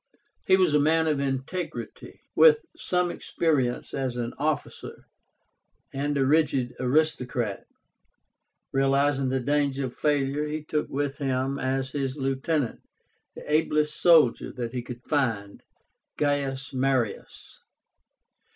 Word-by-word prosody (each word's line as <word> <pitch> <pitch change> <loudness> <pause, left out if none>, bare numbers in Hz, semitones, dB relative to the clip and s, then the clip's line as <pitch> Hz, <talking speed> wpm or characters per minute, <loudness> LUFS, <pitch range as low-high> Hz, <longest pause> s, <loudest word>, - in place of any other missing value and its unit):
He 190 -1 +6
was 185 -5 +3
a 150 - +5
man 160 +2 +3
of 150 -3 +1
integrity, 140 +6 -4
with 460 -1 +6
some 180 -1 0
experience 140 -10 -1
as 130 -3 -2
an 120 0 -3
officer, 150 -1 -3 0.9
and 145 +1 -1
a 135 - +2
rigid 135 -4 +2
aristocrat. 125 -5 0 1.0
Realizing 135 0 +2
the 130 0 0
danger 140 0 0
of 125 - -6
failure, 145 0 0
he 155 0 -4
took 150 0 -2
with 140 0 -2
him 135 0 -1
as 130 0 -1
his 135 -1 -3
lieutenant 135 0 -1 0.6
the - - -9
ablest 150 0 +1
soldier 160 -8 +4
that 120 -1 -5
he 125 - -2
could 120 0 -9
find, 115 -9 -1 0.6
GAIUS 140 -2 -1
MARIUS. 130 -4 -2
140 Hz, 120 wpm, -26 LUFS, 130-150 Hz, 1.0 s, He